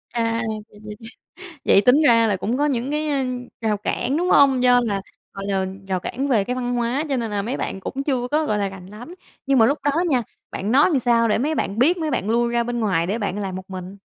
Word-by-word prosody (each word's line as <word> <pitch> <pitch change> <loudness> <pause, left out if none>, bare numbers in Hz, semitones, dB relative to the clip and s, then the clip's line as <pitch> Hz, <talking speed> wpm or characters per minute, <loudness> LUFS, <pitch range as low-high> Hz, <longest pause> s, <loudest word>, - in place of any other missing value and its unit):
À, 230 0 0
vậy 215 0 -6
vậy 210 0 -8 0.7
vậy 195 - +5
tính 260 +8 +5
ra 230 -5 +5
là 205 -3 +1
cũng 225 +7 -2
có 295 - +2
những, 250 -4 -1
ơ, 300 - 0 0.6
cái 220 -1 0
rào 210 - +1
cản, 235 +6 -2
đúng 355 +3 0
hông? 270 -3 +5
Do 245 -1 +5
là, 200 -5 -2 0.3
gọi 195 0 -6
là, 195 -1 0 0.2
rào 185 -1 -1
cản 270 +9 -3
về 220 -7 +2
cái 250 +4 -3
văn 245 -1 -2
hóa 240 +5 -1
cho 275 - 0
nên 230 -3 -3
là 205 -1 -2
mấy 235 +6 -3
bạn 195 - -4
cũng 270 +7 -4
chưa 250 -4 -1
có, 305 +1 +1
gọi 210 - 0
là, 200 -1 0
rành 190 -2 -11
lắm. 220 - -11 0.3
Nhưng 275 -1 +3
mà 225 - +6
lúc 285 +3 +1
đó 285 - +2 0.2
nha, 260 -6 +2 0.3
bạn 205 +4 -3
nói 285 +7 +5
làm 290 - +2
sao 235 -1 +2
để 210 - +2
mấy 300 +6 0
bạn 200 -6 -2
biết, 310 +9 +4
mấy 315 -2 -2
bạn 215 -4 -1
lui 235 +1 +1
ra 235 0 +1
bên 240 0 -3
ngoài 175 -6 +1
để 210 +5 -2
bạn 200 -2 -3
làm 190 -2 -4
một 190 0 -9
mình? 185 +1 -7
235 Hz, 265 wpm, -22 LUFS, 205-265 Hz, 0.7 s, mà